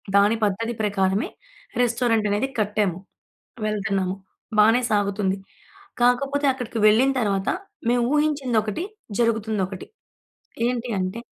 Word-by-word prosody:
దాని 205 Hz, +3 st, +5 dB
పద్ధతి 225 Hz, +4 st, -1 dB
ప్రకారమే 195 Hz, 0 st, +1 dB, 0.5 s
రెస్టారెంట్ 230 Hz, -3 st, +2 dB
అనేది 220 Hz, +7 st, 0 dB
కట్టాము. 205 Hz, -4 st, 0 dB, 0.7 s
వెళ్తున్నాము. 195 Hz, -3 st, -1 dB, 0.4 s
బానే 225 Hz, +4 st, +6 dB
సాగుతుంది. 200 Hz, -1 st, +1 dB, 0.7 s
కాకపోతే, 275 Hz, +4 st, +2 dB
అక్కడికి 245 Hz, -3 st, -5 dB
వెళ్ళిన 245 Hz, +6 st, +4 dB
తర్వాత 195 Hz, -3 st, 0 dB, 0.4 s
మేము 240 Hz, 0 st, +2 dB
ఊహించిందొకటి, 270 Hz, -, 0 dB, 0.4 s
జరుగుతుందొకటి. 215 Hz, -5 st, -1 dB, 0.8 s
ఏంటి 245 Hz, 0 st, -2 dB
అంటే 185 Hz, +5 st, -2 dB
215 Hz, 95 wpm, -23 LUFS, 200-245 Hz, 0.8 s, బానే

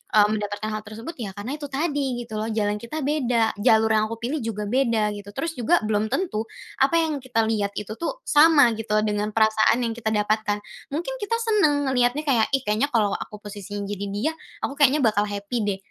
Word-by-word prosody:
mmm, 210 Hz, -1 st, +6 dB
mendapatkan 210 Hz, 0 st, -3 dB
hal 215 Hz, -, -3 dB
tersebut, 220 Hz, +9 st, -8 dB
ya 210 Hz, -, -3 dB
karena 225 Hz, +7 st, -4 dB
itu 295 Hz, -1 st, -6 dB
tadi 285 Hz, 0 st, -1 dB, 0.2 s
gitu 220 Hz, -, -12 dB
loh, 220 Hz, -, -3 dB
jalan 210 Hz, -1 st, -1 dB
kita 275 Hz, +5 st, -4 dB
beda, 245 Hz, -6 st, +1 dB
jalur 220 Hz, +1 st, +4 dB
yang 215 Hz, 0 st, +2 dB
aku 230 Hz, -, -5 dB
pilih 255 Hz, +6 st, -3 dB
juga 215 Hz, -2 st, -3 dB
beda 225 Hz, -2 st, +1 dB
gitu, 205 Hz, -1 st, -9 dB
terus 330 Hz, 0 st, -2 dB
juga 250 Hz, +6 st, +2 dB
belum 215 Hz, 0 st, 0 dB
tentu, 270 Hz, -, -1 dB, 0.4 s
apa 275 Hz, +5 st, +4 dB
yang 315 Hz, -4 st, 0 dB
kita 245 Hz, -3 st, 0 dB
lihat 205 Hz, -2 st, -1 dB
itu 210 Hz, +1 st, -4 dB
tuh, 335 Hz, -, -4 dB
sama 295 Hz, -, +6 dB
gitu 215 Hz, -1 st, -1 dB
dengan 210 Hz, 0 st, -1 dB
perasaan 220 Hz, 0 st, +4 dB
yang 230 Hz, -, -2 dB
kita 225 Hz, -1 st, -3 dB
dapatkan. 210 Hz, 0 st, +1 dB, 0.3 s
Mungkin 335 Hz, -, -3 dB
kita 460 Hz, +3 st, 0 dB
seneng 305 Hz, -11 st, +2 dB
ngeliatnya 250 Hz, +4 st, +1 dB
kayak, 240 Hz, -6 st, +2 dB
"Ih 270 Hz, -, -3 dB
kayaknya 215 Hz, +7 st, +1 dB
kalau 215 Hz, -6 st, +2 dB
aku 210 Hz, -, -6 dB
posisinya 205 Hz, 0 st, -6 dB
jadi 200 Hz, 0 st, -4 dB
dia, 205 Hz, +10 st, -1 dB, 0.3 s
aku 275 Hz, -, -4 dB
kayaknya 280 Hz, +1 st, +6 dB
bakal 210 Hz, -1 st, +2 dB
happy 205 Hz, +3 st, -3 dB
deh, 205 Hz, -2 st, -1 dB
225 Hz, 205 wpm, -24 LUFS, 210-280 Hz, 0.4 s, mmm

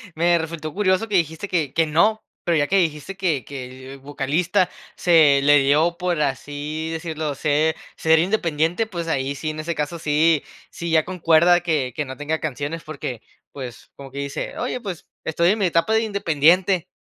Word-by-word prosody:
me 170 Hz, +2 st, +3 dB
resultó 160 Hz, -2 st, -5 dB
curioso 200 Hz, +1 st, +1 dB
que 210 Hz, -, -2 dB
dijiste 165 Hz, +3 st, -1 dB
que 160 Hz, -8 st, -1 dB
que 165 Hz, 0 st, +3 dB
no, 190 Hz, +9 st, +2 dB, 0.2 s
pero 170 Hz, -2 st, +1 dB
ya 145 Hz, -1 st, +2 dB
que 195 Hz, -, +2 dB
dijiste 165 Hz, +1 st, -1 dB
que 165 Hz, -, -1 dB
que 130 Hz, -1 st, -9 dB
al 135 Hz, -, -12 dB
vocalista 145 Hz, +6 st, 0 dB, 0.3 s
se 155 Hz, -5 st, +5 dB
le 145 Hz, +1 st, +6 dB
dio, 150 Hz, +5 st, +2 dB
por 175 Hz, -3 st, -1 dB
así 145 Hz, +3 st, -3 dB
decirlo, 160 Hz, -3 st, -3 dB
ser 150 Hz, +3 st, +1 dB, 0.2 s
ser 160 Hz, 0 st, +3 dB
independiente, 170 Hz, +1 st, 0 dB
pues, 170 Hz, -5 st, -5 dB
ahí 140 Hz, -3 st, -1 dB
sí, 155 Hz, +2 st, -3 dB
en 155 Hz, -, -8 dB
ese 165 Hz, +2 st, -3 dB
caso, 150 Hz, +3 st, -3 dB
sí 155 Hz, +1 st, +2 dB, 0.3 s
sí 170 Hz, -, -5 dB
ya 160 Hz, -1 st, +3 dB
concuerda 175 Hz, -1 st, +4 dB
que 150 Hz, -7 st, -1 dB
que 150 Hz, -, -2 dB
no 130 Hz, 0 st, -8 dB
tenga 155 Hz, +2 st, -2 dB
canciones, 150 Hz, +2 st, -4 dB
porque, 140 Hz, -7 st, -6 dB, 0.3 s
pues, 125 Hz, -5 st, -9 dB
como 140 Hz, -1 st, -10 dB
que 140 Hz, -, -6 dB
dice: 140 Hz, 0 st, -4 dB
"Oye, 250 Hz, -, -3 dB
pues, 195 Hz, -7 st, -7 dB, 0.2 s
estoy 170 Hz, +2 st, +1 dB
en 215 Hz, +3 st, +1 dB
mi 200 Hz, -, +2 dB
etapa 165 Hz, +4 st, +2 dB
de 220 Hz, -, +4 dB
independiente, 180 Hz, -3 st, +2 dB
160 Hz, 185 wpm, -22 LUFS, 145-175 Hz, 0.3 s, le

